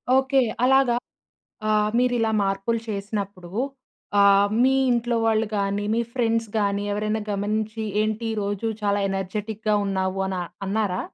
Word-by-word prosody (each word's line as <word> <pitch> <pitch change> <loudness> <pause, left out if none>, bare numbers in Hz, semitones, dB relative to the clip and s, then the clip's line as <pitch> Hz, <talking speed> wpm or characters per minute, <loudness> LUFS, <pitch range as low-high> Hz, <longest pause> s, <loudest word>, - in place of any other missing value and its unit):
Okay. 265 0 +3 0.2
అలాగా 265 -2 +4 0.8
ఆహ్, 210 0 +3
మీరిలా 245 -3 +2
మార్పులు 195 +4 0
చేసినప్పుడు 200 -3 -4 0.7
ఆహ్, 200 0 +6 0.2
మీ 265 +1 +4 0.2
ఇంట్లో 240 0 +1
వాళ్ళు 225 0 +2
కానీ, 200 0 0
మీ 230 - +1
ఫ్రెండ్స్ 230 -2 0
గాని, 200 -1 0
ఎవరైనా 215 +1 -1
గమనించి 215 +2 -2 0.2
ఏంటి 220 +1 -1
ఈ - - -2
రోజు 205 +2 -2 0.2
చాలా 205 0 +1
ఎనర్జిటిక్‌గా 210 +3 -2
ఉన్నావు 190 0 -1
అని 185 -2 -2 0.3
అన్నారా? 200 -2 0
210 Hz, 130 wpm, -24 LUFS, 200-225 Hz, 0.8 s, ఆహ్